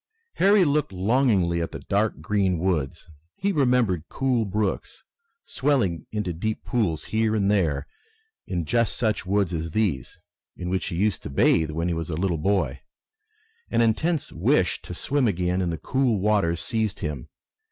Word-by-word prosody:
Harry 195 Hz, -1 st, +5 dB
looked 150 Hz, -4 st, +1 dB
longingly 95 Hz, -4 st, +2 dB
at 85 Hz, -, -3 dB
the -, -, -6 dB
dark 105 Hz, +2 st, 0 dB
green 95 Hz, -4 st, +1 dB
woods. 80 Hz, -7 st, -1 dB, 0.3 s
He 200 Hz, +1 st, 0 dB
remembered 125 Hz, -, +2 dB
cool 130 Hz, -4 st, 0 dB
brooks, 105 Hz, 0 st, -2 dB, 0.4 s
swelling 120 Hz, -, 0 dB
into 105 Hz, -5 st, -2 dB
deep 110 Hz, +7 st, -3 dB
pools 95 Hz, -10 st, 0 dB
here 110 Hz, 0 st, 0 dB
and 100 Hz, -1 st, +2 dB
there 80 Hz, -8 st, +1 dB, 0.6 s
in 85 Hz, -4 st, -2 dB
just 115 Hz, +5 st, +1 dB
such 110 Hz, -5 st, -1 dB
woods 100 Hz, -2 st, +1 dB
as 80 Hz, 0 st, -3 dB
these, 95 Hz, -, -1 dB, 0.4 s
in 90 Hz, 0 st, -4 dB
which 95 Hz, -, -1 dB
he 90 Hz, -, -3 dB
used 100 Hz, -1 st, 0 dB
to -, -, -7 dB
bathe 80 Hz, +3 st, +3 dB
when 80 Hz, +2 st, -2 dB
he 85 Hz, -, 0 dB
was 80 Hz, -1 st, -4 dB
a 80 Hz, -, -3 dB
little 85 Hz, -3 st, 0 dB
boy. 80 Hz, -7 st, 0 dB, 0.9 s
An -, -, +2 dB
intense 150 Hz, +8 st, +1 dB
wish -, -, +1 dB
to -, -, -8 dB
swim 140 Hz, -3 st, +1 dB
again 90 Hz, -1 st, 0 dB
in 90 Hz, -, 0 dB
the 80 Hz, -, -3 dB
cool 130 Hz, -, +1 dB
waters 100 Hz, -5 st, +1 dB
seized 110 Hz, -4 st, -2 dB
him. 75 Hz, -5 st, -4 dB
100 Hz, 165 wpm, -25 LUFS, 85-115 Hz, 0.9 s, Harry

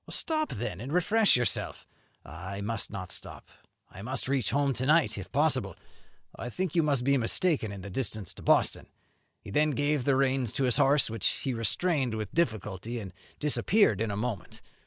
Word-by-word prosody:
'Stop, 310 Hz, -1 st, -1 dB
then, 100 Hz, -3 st, -4 dB
and 130 Hz, +4 st, -6 dB
refresh 205 Hz, +6 st, +4 dB
yourself.' 120 Hz, -1 st, -1 dB, 0.4 s
'I 100 Hz, +2 st, -7 dB
must 110 Hz, +1 st, -3 dB
not 95 Hz, -3 st, -6 dB
stop, -, -, -6 dB, 0.4 s
I 95 Hz, -, -10 dB
must 125 Hz, +5 st, -3 dB
reach 135 Hz, -5 st, +1 dB
home 140 Hz, -1 st, +1 dB
to 130 Hz, +1 st, -2 dB
night, 160 Hz, 0 st, +4 dB
if -, -, -8 dB
possible, -, -, +1 dB, 0.6 s
though -, -, -11 dB
I 120 Hz, -, -4 dB
think 185 Hz, +8 st, -3 dB
you 170 Hz, -, +4 dB
must 140 Hz, -5 st, +1 dB
be 140 Hz, +1 st, +3 dB
mistaken 125 Hz, -, +1 dB
in 100 Hz, -1 st, -7 dB
the 100 Hz, -, -8 dB
distance 110 Hz, -3 st, -3 dB
to -, -, -12 dB
Boston.' -, -, +2 dB, 0.6 s
He -, -, -9 dB
then 150 Hz, +7 st, +3 dB
gave 145 Hz, -1 st, 0 dB
the 140 Hz, -, +3 dB
reins 130 Hz, -3 st, +1 dB
to 140 Hz, -, -1 dB
his 125 Hz, -2 st, +2 dB
horse, 140 Hz, -3 st, +4 dB
which 115 Hz, -2 st, 0 dB
he 135 Hz, -, -1 dB
restrained 130 Hz, -, 0 dB
with 110 Hz, -2 st, -5 dB
difficulty, 110 Hz, -, -2 dB
and 95 Hz, -4 st, -8 dB, 0.2 s
disappeared 150 Hz, -, +2 dB
in 115 Hz, -, 0 dB
a 100 Hz, -, -3 dB
moment. 105 Hz, -6 st, -5 dB
125 Hz, 190 wpm, -29 LUFS, 110-145 Hz, 0.6 s, refresh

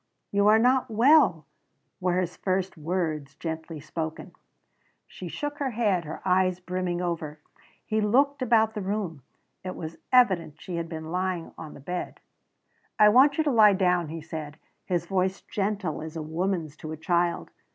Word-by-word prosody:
"You 200 Hz, 0 st, +3 dB
are 215 Hz, +1 st, +7 dB
not 255 Hz, +2 st, +3 dB
well," 260 Hz, +8 st, +4 dB, 0.5 s
were 180 Hz, -1 st, +1 dB
his 180 Hz, -1 st, -2 dB
first 190 Hz, 0 st, -1 dB
words, 155 Hz, -4 st, -3 dB
gently 160 Hz, 0 st, -5 dB
spoken. 160 Hz, +1 st, -5 dB, 0.7 s
She -, -, -9 dB
shook 290 Hz, 0 st, -5 dB
her 280 Hz, -2 st, 0 dB
head, 210 Hz, -7 st, 0 dB
her 155 Hz, -, -7 dB
eyes 185 Hz, 0 st, +2 dB
brimming 180 Hz, -1 st, -2 dB
over. 160 Hz, -3 st, -3 dB, 0.5 s
He 220 Hz, 0 st, 0 dB
looked 275 Hz, +6 st, +2 dB
about 220 Hz, -3 st, +3 dB
the 210 Hz, -, -4 dB
room. 190 Hz, -6 st, -3 dB, 0.4 s
It 185 Hz, 0 st, -5 dB
was 160 Hz, 0 st, -7 dB
evident 185 Hz, -, +3 dB
she 175 Hz, -2 st, -5 dB
had 165 Hz, -1 st, -4 dB
been 160 Hz, -1 st, -6 dB
lying 180 Hz, -2 st, -2 dB
on 160 Hz, -2 st, -9 dB
the -, -, -11 dB
bed. 180 Hz, +6 st, -5 dB, 0.8 s
"I 210 Hz, -, +7 dB
want 265 Hz, +6 st, +5 dB
you 315 Hz, -, +3 dB
to 295 Hz, -, +1 dB
lie 215 Hz, -4 st, +7 dB
down," 180 Hz, -3 st, +2 dB
he 160 Hz, +1 st, -6 dB
said, 155 Hz, -2 st, -7 dB, 0.3 s
his 175 Hz, -2 st, -1 dB
voice 190 Hz, +1 st, 0 dB
gentle 195 Hz, -6 st, -2 dB
as 160 Hz, +1 st, -7 dB
a 160 Hz, -, -4 dB
woman's 165 Hz, -1 st, -2 dB
to 155 Hz, -, -7 dB
a 160 Hz, -, -5 dB
child. 170 Hz, +2 st, 0 dB
180 Hz, 170 wpm, -27 LUFS, 160-210 Hz, 0.8 s, are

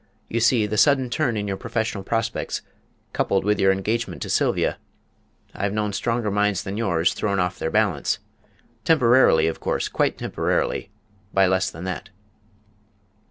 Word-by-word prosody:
You 115 Hz, -, -1 dB
see, 115 Hz, -1 st, +3 dB
the 105 Hz, 0 st, -1 dB
sudden 135 Hz, -4 st, +3 dB
turn 125 Hz, -7 st, 0 dB
in 105 Hz, 0 st, -2 dB
your 95 Hz, -1 st, -2 dB
professional 110 Hz, -2 st, -3 dB
prospects, 115 Hz, +3 st, -2 dB, 0.5 s
coupled 95 Hz, -1 st, 0 dB
with 105 Hz, -1 st, +2 dB
your 95 Hz, -1 st, +5 dB
engagement 110 Hz, +5 st, -2 dB
to -, -, -4 dB
Sylvia -, -, +1 dB, 0.7 s
I've 100 Hz, +1 st, -2 dB
known 105 Hz, -1 st, -1 dB
stronger 115 Hz, 0 st, -1 dB
minds 105 Hz, -1 st, +1 dB
than 95 Hz, -, -5 dB
yours 90 Hz, -6 st, +1 dB
thrown 100 Hz, -2 st, -1 dB
off 90 Hz, 0 st, -1 dB
their 80 Hz, -, -1 dB
balance 100 Hz, -7 st, +1 dB, 0.7 s
temporarily, 125 Hz, -, +5 dB
of 80 Hz, -, -2 dB
course, -, -, -1 dB
quite -, -, 0 dB
temporarily -, -, -1 dB, 0.5 s
by 95 Hz, 0 st, +5 dB
less 95 Hz, 0 st, +1 dB
than 85 Hz, -, -9 dB
that." 95 Hz, +1 st, -5 dB
105 Hz, 155 wpm, -23 LUFS, 95-115 Hz, 0.7 s, your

